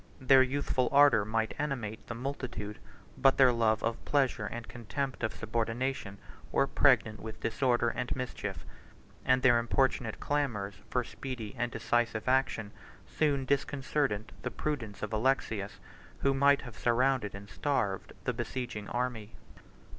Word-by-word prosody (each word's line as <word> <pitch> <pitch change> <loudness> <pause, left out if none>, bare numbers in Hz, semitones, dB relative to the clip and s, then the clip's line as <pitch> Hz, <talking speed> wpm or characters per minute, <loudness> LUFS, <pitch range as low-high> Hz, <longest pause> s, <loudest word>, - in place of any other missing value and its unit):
Their 130 0 +6
youthful 130 -1 +1
ardor 140 -6 +6
might 110 +1 -1
animate 125 -7 -3
the 120 - -5
multitude; 120 -5 -5 0.4
but 135 - +5
their 130 -2 +7
love 110 -2 +2
of 115 - -2
pleasure 130 -7 +1
and 120 +1 -6
contempt 130 +3 -4
of 110 - +1
subordination 115 -1 -2 0.3
were - - +3
pregnant 120 -7 +3
with 110 0 -8
disorder 120 0 +1
and 125 - -3
mischief; 125 -1 -5 0.6
and 130 0 +3
their 120 -2 +6
importunate 120 -1 0
clamors 120 -9 -1 0.2
for 125 - +1
speedy 120 -3 -6
and 120 0 -2
decisive 115 0 0
action 130 -5 +1 0.7
disconcerted 135 -5 0
the - - -2
prudence 120 -11 -4
of 105 - -3
Alexius, 110 -4 0 0.4
who 140 - +3
might 140 +1 +4
have 125 -4 -10
surrounded 120 -3 +2
and 100 +1 -9
starved 105 -4 -1
the 125 - 0
besieging 120 -3 -4
army. 120 -3 -3
120 Hz, 135 wpm, -31 LUFS, 110-135 Hz, 0.7 s, their